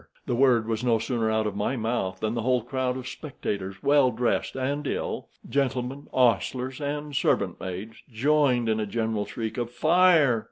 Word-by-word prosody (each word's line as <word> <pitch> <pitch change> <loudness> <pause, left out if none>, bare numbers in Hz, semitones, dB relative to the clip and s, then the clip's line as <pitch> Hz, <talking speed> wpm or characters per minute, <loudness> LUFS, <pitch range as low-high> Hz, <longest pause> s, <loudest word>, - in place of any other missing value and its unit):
The - - -1
word 120 -3 +3
was 115 0 -2
no 120 -2 +3
sooner 115 0 -1
out 110 0 +1
of 105 -2 -2
my 105 +6 -1
mouth 110 -6 -2
than 110 0 0
the 115 - -1
whole 125 0 +1
crowd 130 +1 -2
of 130 -1 -6
spectators, 100 -10 -5
well 140 -2 +5
dressed 120 0 -1
and 140 +2 -2
ill—gentlemen, 135 0 -3
hostlers, 125 - +1
and 145 0 -3
servant - - +1
maids—joined 120 +7 0
in 110 0 +1
a 105 - -2
general 110 -1 -1
shriek 115 0 -4
of 120 -1 -2
"Fire!" 155 -1 +4
120 Hz, 165 wpm, -26 LUFS, 110-135 Hz, -, well